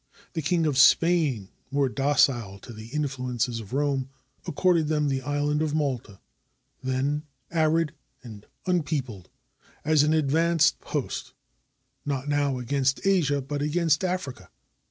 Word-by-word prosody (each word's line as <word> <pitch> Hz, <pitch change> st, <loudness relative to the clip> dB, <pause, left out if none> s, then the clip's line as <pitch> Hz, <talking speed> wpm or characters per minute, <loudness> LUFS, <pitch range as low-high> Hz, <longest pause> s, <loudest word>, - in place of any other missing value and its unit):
The 165 Hz, -, -2 dB
King 165 Hz, +2 st, +1 dB
of 140 Hz, -3 st, +1 dB
Spain, 145 Hz, -, +4 dB, 0.2 s
more 140 Hz, -1 st, +1 dB
docile 130 Hz, -6 st, +1 dB
to 120 Hz, -, -10 dB
the 110 Hz, 0 st, -10 dB
influences 125 Hz, -4 st, -2 dB
of 110 Hz, -1 st, -10 dB
Rome, 135 Hz, -1 st, 0 dB, 0.4 s
accorded 170 Hz, -1 st, +2 dB
them 150 Hz, -1 st, +1 dB
the 135 Hz, -1 st, -1 dB
island 145 Hz, +2 st, 0 dB
of 155 Hz, -1 st, 0 dB
Malta, 130 Hz, -9 st, -2 dB, 0.6 s
then 130 Hz, +3 st, -1 dB, 0.3 s
arid 160 Hz, -1 st, +2 dB, 0.3 s
and 110 Hz, -4 st, -11 dB, 0.2 s
unpeopled, 145 Hz, -, -2 dB, 0.6 s
as 155 Hz, -1 st, +4 dB
an 150 Hz, +2 st, +3 dB
advance 160 Hz, +2 st, +3 dB
post, -, -, -4 dB, 0.7 s
not 140 Hz, -1 st, -3 dB
now 145 Hz, -2 st, +1 dB
against 135 Hz, +3 st, 0 dB
Asia, 150 Hz, -8 st, +2 dB
but 145 Hz, +2 st, -4 dB
against 155 Hz, +2 st, +1 dB
Africa. 180 Hz, -9 st, -3 dB
145 Hz, 130 wpm, -26 LUFS, 130-155 Hz, 0.7 s, Spain